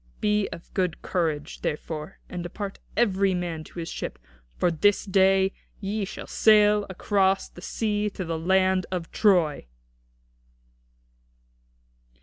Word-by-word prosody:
Be 210 -1 +1
of 170 - -10
good 180 -4 -1
courage, 160 -4 -2
therefore, 150 0 -4
and 180 - -5
depart 195 +3 -6 0.2
every 195 -4 +3
man 170 -3 -3
to - - -14
his 165 -1 -4
ship, - - -5 0.4
for 175 - +2
this 205 +5 +2
day 190 0 +3 0.3
ye 205 0 -2
shall - - -7
sail 210 -1 +4
across 195 +1 +1
the 175 - -14
sea 210 +1 -1
to 190 -2 -6
the 165 -1 -2
land 185 +1 +2
of 175 -3 -4
Troy." 175 - +2
190 Hz, 130 wpm, -26 LUFS, 170-205 Hz, 0.4 s, sail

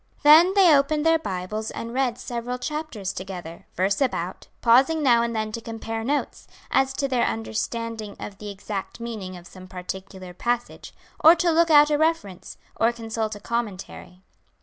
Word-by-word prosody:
Then 325 +6 +7
they 365 -6 +7
opened 295 +2 +1
their 325 0 +4
Bibles 210 - -4
and 230 0 -6
read 255 -2 0
several 245 0 -4
chapters 275 -8 -4
together, 180 -3 -8
verse 195 +7 0
about, 265 -2 -2
pausing 270 +7 +4
now 240 -4 +5
and 235 0 -2
then 215 0 -2
to 230 - -5
compare 225 0 -5
notes, 285 +5 -2 0.2
as 270 0 +3
to 275 +1 -1
their 250 -3 +1
understanding 210 - -4
of 200 -1 -8
the 210 - -7
exact 200 +1 -6
meaning 215 -6 -6
of 175 - -13
some 185 0 -13
particular 185 0 -8
passage, 240 +5 -3 0.3
or 320 +2 +9
to 345 0 +1
look 335 +1 +3
out 295 -1 +6
a 295 - +2
reference, 315 - -1 0.2
or 230 +1 +2
consult 225 -2 -4
a - - -9
commentary. 200 -4 -5
230 Hz, 170 wpm, -24 LUFS, 195-280 Hz, 0.3 s, or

